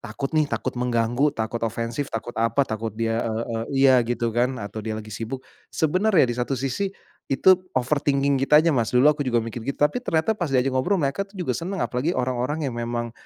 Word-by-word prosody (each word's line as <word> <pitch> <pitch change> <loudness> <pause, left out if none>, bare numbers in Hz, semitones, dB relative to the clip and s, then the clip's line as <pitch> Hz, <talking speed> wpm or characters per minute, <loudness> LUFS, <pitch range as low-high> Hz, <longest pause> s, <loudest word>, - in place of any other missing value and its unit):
takut 120 +6 -5
nih, 155 -2 +2
takut 130 - -2
mengganggu, 120 +3 +1
takut 110 +1 -2
ofensif, 115 +4 -2
takut 115 +1 -5
apa, 115 +5 +2
takut 110 -2 -4
dia 115 0 0
e 115 - -2
e 115 - -4 0.3
iya 130 -2 +7
gitu 120 -1 -1
kan, 125 +3 +1
atau 105 0 -6
dia 110 0 -4
lagi 110 0 -8
sibuk. 115 +5 -5 0.2
Sebenarnya 185 +2 +2
di 120 - -1
satu 130 +2 -1
sisi 135 +10 -1 0.4
itu 185 +8 +6 0.2
overthinking 140 0 +1
kita 150 +2 +6
aja, 160 -1 +3
Mas. 115 -3 +1
Dulu 125 +3 +4
aku 150 -1 +3
juga 125 -3 +1
mikir 115 +1 -4
gitu, 140 +4 -4
tapi 150 +13 +1
ternyata 165 +2 +1
pas 175 -8 -3
diajak 130 0 +1
ngobrol, 180 +10 +1
mereka 140 +4 0
tuh 195 0 -13
juga 140 -8 -1
senang, 185 +6 -4
apalagi 130 +5 -1
orang-orang 130 +4 -1
yang 130 - -3
memang 120 0 -3
130 Hz, 210 wpm, -24 LUFS, 115-150 Hz, 0.4 s, iya